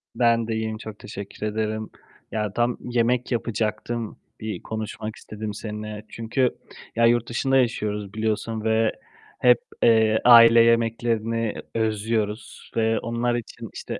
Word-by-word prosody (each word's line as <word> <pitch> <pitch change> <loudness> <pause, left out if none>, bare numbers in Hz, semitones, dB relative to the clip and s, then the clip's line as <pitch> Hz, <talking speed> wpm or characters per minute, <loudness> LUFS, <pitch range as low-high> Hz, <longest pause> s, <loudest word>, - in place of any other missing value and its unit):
Ben 115 -1 +3
de 110 - -1
iyiyim, 110 0 -2
çok 110 -1 -9
teşekkür 100 +1 -7
ederim. 110 0 -2 0.4
Ya, 105 -2 -2
tam 120 +1 +1
yemek 120 +1 0
yapacaktım, 115 0 -2 0.2
bir 110 -5 -5
konuşmak 110 0 -5
istedim 105 0 -6
seninle. 105 0 -6
Çünkü, 120 +3 -1 0.4
ya, 115 0 +4
yurt 120 0 +3
dışında 135 +3 +1
yaşıyoruz 105 -5 -1
biliyorsun 110 0 -2
ve 110 0 +2 0.5
hep, - - +5 0.2
eee, 110 -1 +5
aile 115 -1 +9
yemeklerini 115 -1 +1 0.2
özlüyoruz 110 0 -2
ve 110 0 +2
onlar 120 +1 -1
için, 120 - -6
işte - - -6
110 Hz, 130 wpm, -24 LUFS, 110-115 Hz, 0.5 s, aile